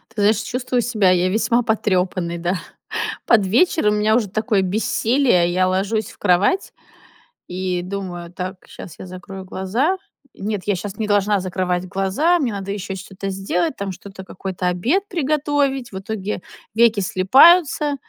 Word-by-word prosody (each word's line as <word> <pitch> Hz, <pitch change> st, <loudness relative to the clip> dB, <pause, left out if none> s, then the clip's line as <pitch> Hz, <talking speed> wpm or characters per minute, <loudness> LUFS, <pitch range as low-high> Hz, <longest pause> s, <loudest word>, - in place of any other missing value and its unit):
Ты 210 Hz, -, -1 dB
знаешь, 210 Hz, +1 st, +4 dB
чувствую 250 Hz, +1 st, -1 dB
себя 215 Hz, -6 st, +2 dB
я 180 Hz, 0 st, +2 dB
весьма 230 Hz, +4 st, +1 dB
потрёпанной, 185 Hz, -6 st, 0 dB
да. 175 Hz, +3 st, -1 dB, 0.7 s
Под 215 Hz, -5 st, +4 dB
вечер 265 Hz, -, +2 dB
у 210 Hz, -, +3 dB
меня 210 Hz, +1 st, +2 dB
уже 225 Hz, -4 st, 0 dB
такое 215 Hz, 0 st, 0 dB
бессилие. 215 Hz, 0 st, +2 dB
Я 185 Hz, +1 st, +2 dB
ложусь 200 Hz, +4 st, -1 dB
в -, -, -17 dB
кровать 200 Hz, -, +2 dB, 0.8 s
и 180 Hz, 0 st, -2 dB
думаю: 180 Hz, -2 st, -6 dB
"Так, 185 Hz, +1 st, -5 dB
щас 165 Hz, -, -11 dB
я -, -, -7 dB
закрою 190 Hz, +1 st, -9 dB
глаза, 225 Hz, -, -1 dB, 0.4 s
нет, 205 Hz, -1 st, -3 dB
я 205 Hz, -, +2 dB
щас 195 Hz, +2 st, -6 dB
не 220 Hz, -, -2 dB
должна 205 Hz, 0 st, +2 dB
закрывать 180 Hz, -1 st, -2 dB
глаза, 200 Hz, -, +1 dB
мне 260 Hz, -7 st, 0 dB
надо 200 Hz, -1 st, -5 dB
ещё 200 Hz, -1 st, -4 dB
что-то 190 Hz, +1 st, -6 dB
сделать, 190 Hz, -3 st, -1 dB
там 200 Hz, -1 st, -3 dB
что-то, 190 Hz, +1 st, -10 dB
какой-то 185 Hz, -1 st, -4 dB
обед 240 Hz, -, +1 dB
приготовить". 290 Hz, -5 st, 0 dB
В 190 Hz, -, -5 dB
итоге, 205 Hz, -1 st, -4 dB, 0.3 s
веки 230 Hz, -2 st, +4 dB
слипаются 285 Hz, -, +5 dB
200 Hz, 155 wpm, -20 LUFS, 185-230 Hz, 0.8 s, слипаются